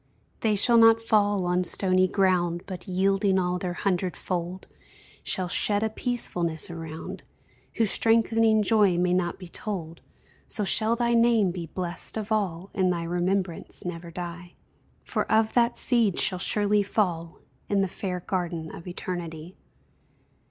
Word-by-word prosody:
They 215 -2 +1
shall 235 +3 +4
not 225 0 +7
fall 205 -4 +1
on 180 +1 +1
stony 185 0 +2
ground, 180 -3 +1
But, 185 0 -8
yielding 195 +1 +1
all 180 -1 0
their 180 -1 -3
hundred 180 -1 -1
fold, 180 0 -4 0.6
Shall 185 -1 -1
shed 205 +4 +1
a 220 - -1
peacefulness 175 -10 0
around, 160 -1 -7 0.5
Whose 225 -3 +2
strengthening 225 -1 +3
joy 205 -5 +3
may 180 0 +2
not 180 -1 0
be 180 - -10
told, 170 -3 -5 0.5
So 215 - 0
shall 220 +3 +3
thy 235 0 +1
name 230 -5 +3
be 170 -2 -6
blest 175 +5 -4
of 215 0 -5
all, 195 -4 -1
And 185 -3 +1
thy 170 -1 -2
remembrance 175 +1 -2
never 170 -1 -6
die; 175 0 -8 0.5
For - - -3
of 220 0 +3
that 240 0 +2
seed 230 -7 +2
shall 185 - +2
surely 205 +2 +2
fall 180 -5 -1 0.3
In 200 -1 +2
the 195 - +1
fair 180 0 -5
garden 170 -3 -3
of 170 - -10
Eternity. 175 -2 -6
185 Hz, 150 wpm, -26 LUFS, 175-215 Hz, 0.6 s, not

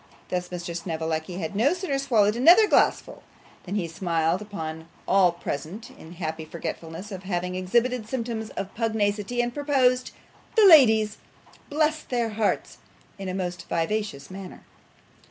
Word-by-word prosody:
Thus 180 -1 -2
Mr. 175 -1 -5
Snevellicci 160 0 -3
had 180 +1 -4
no 270 - +3
sooner 350 -7 -2
swallowed 220 -6 +2
another 345 - +7
glassful - - +2 0.4
than 195 +2 -4
he 185 -5 -1
smiled 165 +1 0
upon 160 -6 -6 0.2
all 190 -2 +5
present 170 +4 -6
in 160 +2 -13
happy 160 -2 -4
forgetfulness 165 +4 -7
of 190 -2 -6
having 180 -1 -3
exhibited 225 +5 0
symptoms 230 -3 -3
of 195 0 -4
pugnacity, 220 0 0
and 240 0 -3
proposed 260 -3 +2 0.5
'The 440 -3 +6
ladies! 220 - +6 0.5
Bless 310 +1 +1
their 240 -2 -1
hearts!' 215 -1 -1 0.4
in 195 -1 -4
a 185 - -3
most 180 -2 -4
vivacious 170 -4 -2
manner. 190 -1 -9
200 Hz, 140 wpm, -25 LUFS, 175-240 Hz, 0.5 s, another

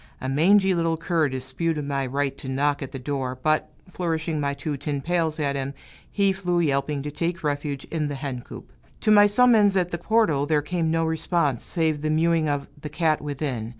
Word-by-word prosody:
A 130 - -4
mangy 190 +8 +4
little 165 -1 0
cur 165 -2 +1
disputed 145 +4 -2
my 140 -2 -1
right 140 +1 -1
to 130 - -7
knock 145 +2 0
at 135 - -5
the - - -6
door; 130 -1 -3
but, 155 0 +1 0.2
flourishing 160 -3 -2
my 140 -1 -1
two 145 +1 -3
tin 140 +1 -3
pails 165 0 -1
at 140 -2 0
him, 135 0 -3 0.4
he 200 -1 +2
flew 180 -2 -1
yelping 140 -2 0
to 145 - -4
take 170 +3 -3
refuge 145 -1 -2
in 155 -2 -1
the 145 - -4
hen 135 -2 -4
coop. - - -11 0.3
To 215 - +2
my 205 -1 +7
summons 210 -2 +4
at 180 -1 0
the 170 - -3
portal, 175 -9 +2
there 150 -1 +2
came 165 0 -1
no 165 0 +1
response, 160 -4 0
save 160 -3 -1
the 155 - -1
mewing 160 0 +2
of 145 -1 -1 0.2
the 150 - -5
cat 155 0 +1
within. 140 -6 -3
155 Hz, 205 wpm, -24 LUFS, 140-170 Hz, 0.4 s, my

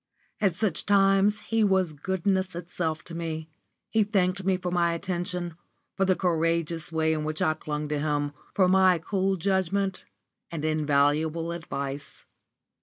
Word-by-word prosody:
At 195 -5 +2
such 210 +1 -1
times 200 +1 +4
he 225 +1 +1
was 190 -5 +2
goodness 190 +3 -1
itself 165 -2 -3
to 170 - -9
me. 160 -1 -4 0.4
He 220 -1 +4
thanked 195 -2 +1
me 190 0 +2
for 180 -1 -4
my 170 -1 +2
attention, 175 0 -3 0.4
for 195 - +2
the 185 -1 +3
courageous 165 -1 0
way 160 0 +1
in 155 -1 -2
which 155 0 -2
I 155 - +2
clung 150 -1 -4
to 150 -1 -1
him, 145 -1 -1 0.2
for 185 -2 +4
my 185 -1 +5
cool 190 +3 0
judgment, 190 +1 0 0.5
and 160 -2 -4
invaluable 155 +2 +1
advice. 140 -4 -6
170 Hz, 150 wpm, -27 LUFS, 155-190 Hz, 0.5 s, my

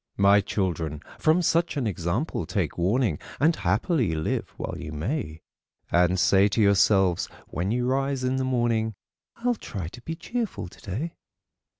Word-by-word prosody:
My 100 +1 +6
children, 85 -7 -2 0.2
from 160 +3 +3
such 170 -1 +2
an 135 - 0
example 100 - -2
take 90 -8 -1
warning, 100 - +1 0.2
And 160 +4 +4
happily 105 - +1
live 80 0 -2
while - - -4
you 85 -3 -6
may; 80 - -3 0.5
And 90 +1 +3
say 95 +2 +5
to 105 - -1
yourselves, 100 -3 +4 0.2
when 90 +5 -2
you 120 +2 0
rise 135 +1 0
in 130 +1 +1
the 130 - 0
morning, 120 -4 +1 0.4
"I'll 245 +1 +1
try 95 - -6
to 120 - -12
be 165 +6 -5
cheerful 225 - -3
today." 110 - -5
105 Hz, 155 wpm, -26 LUFS, 90-135 Hz, 0.5 s, My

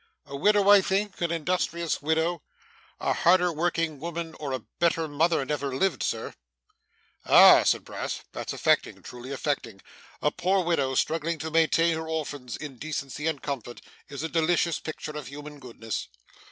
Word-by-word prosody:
'A 140 0 -8
widow, 205 +7 +3
I 205 -1 +8
think? 195 +1 -1
an 170 - +1
industrious 170 0 -1
widow?' 160 +2 0 0.6
'A - - 0
harder 180 0 +3
working 165 -2 -1
woman 170 +1 -5
or 145 -3 -4
a 130 -4 -4
better 165 -1 +2
mother 155 0 +1
never 140 -2 -2
lived, 190 +6 0
Sir.' - - -2 0.9
'Ah!' - - +8
cried - - +1
Brass. - - -5
'That's - - -5
affecting, - - +1
truly 125 +2 -9
affecting. 135 -7 -3 0.4
A 150 - +1
poor 185 +3 +1
widow 140 -6 0
struggling 165 +4 0
to 160 +1 -5
maintain 165 +1 +3
her 160 0 -4
orphans 145 -6 -4
in 145 -5 -9
decency 150 -1 -4
and 160 -4 -2
comfort, 125 -4 -5 0.3
is 140 +2 -6
a - - -1
delicious 170 +1 +1
picture 155 -1 -6
of 150 -4 -6
human 145 +2 -9
goodness. 115 -4 -6
160 Hz, 160 wpm, -27 LUFS, 140-170 Hz, 0.9 s, I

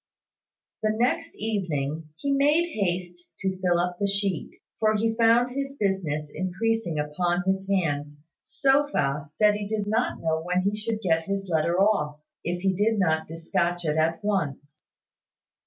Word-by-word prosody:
The 215 0 +2
next 255 +9 0
evening 160 -8 -2
he 280 - -2
made 295 +5 +3
haste 175 -3 -3
to 190 -1 -2
fill 175 -2 +3
up 175 0 -1
the 200 - +1
sheet, 200 -3 0 0.3
for 215 -1 +3
he 225 +1 +1
found 235 +2 +3
his 275 0 -3
business 155 -7 -1
increasing 185 -1 -1
upon 175 +4 0
his 190 0 0
hands 145 -6 0 0.3
so 275 +1 +2
fast 150 - -2
that 210 -1 +6
he 205 -1 -3
did 210 -1 -1
not 220 +4 0
know 160 -1 0
when 180 +2 0
he 200 +2 +1
should 215 +1 -3
get 165 -4 +1
his 195 +1 -3
letter 170 +2 +1
off, 170 -8 +2 0.2
if 175 +1 -3
he 190 -1 +3
did 215 +4 +1
not 160 -5 +1
despatch 170 +2 -1
it 150 -1 +1
at 165 +3 +1
once. 150 -7 -2
190 Hz, 160 wpm, -26 LUFS, 165-215 Hz, 0.3 s, that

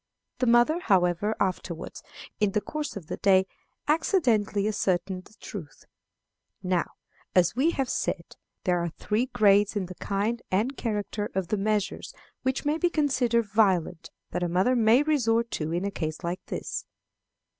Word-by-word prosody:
The 255 - +1
mother, 240 +8 +4
however, 190 - +2
afterwards, 185 -3 -3 0.4
in 210 -2 +2
the - - +3
course 305 +7 -5
of 185 - -8
the - - -5
day, 190 -1 +4 0.4
accidentally 245 - +2
ascertained 185 -3 -1
the 215 - -19
truth. 190 -7 -9 0.8
Now, 180 -2 0 0.4
as 180 +1 +4
we 275 +6 +3
have 270 -2 +1
said, - - -3 0.3
there 180 -1 +2
are 170 0 -1
three 215 +9 -1
grades 205 -2 +4
in 200 -3 -1
the 185 - -8
kind 205 +6 -2
and 220 +9 0
character 210 -2 -3
of 190 -3 -1
the 215 - +1
measures 205 -1 -1 0.3
which 260 +1 -1
may 300 +2 +1
be 350 - +3
considered 255 -7 +1
violent 200 -6 +1 0.2
that 180 - -2
a 175 - 0
mother 185 +9 +2
may 235 +3 +5
resort 235 -6 +1
to 155 0 -2
in 175 +3 -1
a 200 - -1
case 155 -4 -4
like 175 +2 -3
this. - - -4
210 Hz, 160 wpm, -27 LUFS, 185-240 Hz, 0.8 s, may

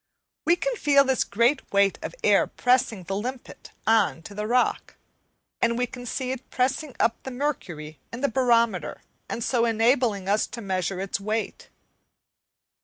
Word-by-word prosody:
We 340 - +5
can - - -2
feel 280 -5 +5
this 265 -1 +1
great 235 +7 +1
weight 200 -1 +3
of - - -6
air - - +4
pressing 245 -6 +1
the 195 +3 -4
limpet 245 +5 -6 0.2
on 215 -7 +2
to 205 - -10
the 210 +1 -3
rock; 250 +2 +1 0.7
and 235 0 +2
we 250 - +1
can 245 0 -9
see 255 +1 -2
it 260 0 -7
pressing 265 +2 -1
up 230 - +1
the - - -6
mercury 175 - -4
in 230 - -6
the 280 - +3
barometer 230 - +1 0.3
and 235 - -3
so 240 -1 +1
enabling 225 -3 +2
us 205 +2 +2
to 235 - -8
measure 190 -2 -2
its 195 +1 -2
weight. 215 +2 -3
235 Hz, 165 wpm, -25 LUFS, 200-255 Hz, 0.7 s, We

